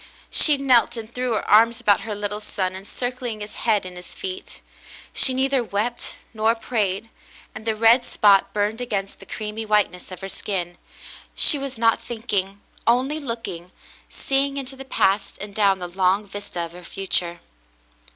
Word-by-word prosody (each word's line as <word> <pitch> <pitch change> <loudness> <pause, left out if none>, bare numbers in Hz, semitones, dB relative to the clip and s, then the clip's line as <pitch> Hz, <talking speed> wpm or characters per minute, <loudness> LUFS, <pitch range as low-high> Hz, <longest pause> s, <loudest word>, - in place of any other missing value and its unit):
She 300 -2 +8
knelt 250 -3 +4
and 225 +1 -8
threw 250 -1 -1
her 215 - -2
arms 225 +2 +5
about 205 -5 +3
her 210 0 -5
little 205 0 -3
son, 190 -3 -3
encircling 245 +4 -5
his 210 0 -7
head 215 -4 +1
and 180 -1 -8
his 180 0 -11
feet. 385 0 -7 0.5
She 265 - +6
neither 265 0 +1
wept 230 +3 -3 0.2
nor 220 +1 +2
prayed; 220 -2 -2 0.4
and 220 - -9
the 220 - +1
red 230 +3 +5
spot 200 -4 +3
burned 210 +3 -1
against 200 -5 -3
the - - -14
creamy 215 +1 -4
whiteness 210 -4 0
of 185 - -9
her 195 - -5
skin. 175 -3 -4 0.6
She 290 - +5
was 275 -2 -5
not 230 0 +2
thinking, 205 -4 -3 0.3
only 260 +6 +2
looking, 230 - -6 0.4
seeing 275 +1 0
into 270 -1 -5
the 270 0 -10
past 195 -6 +1
and 200 0 -8
down 200 -2 +3
the 180 -1 -6
long 190 +3 +1
vista 200 -3 -6
of 165 - -11
her 180 +1 -12
future. 175 -1 -2
215 Hz, 170 wpm, -23 LUFS, 195-245 Hz, 0.6 s, She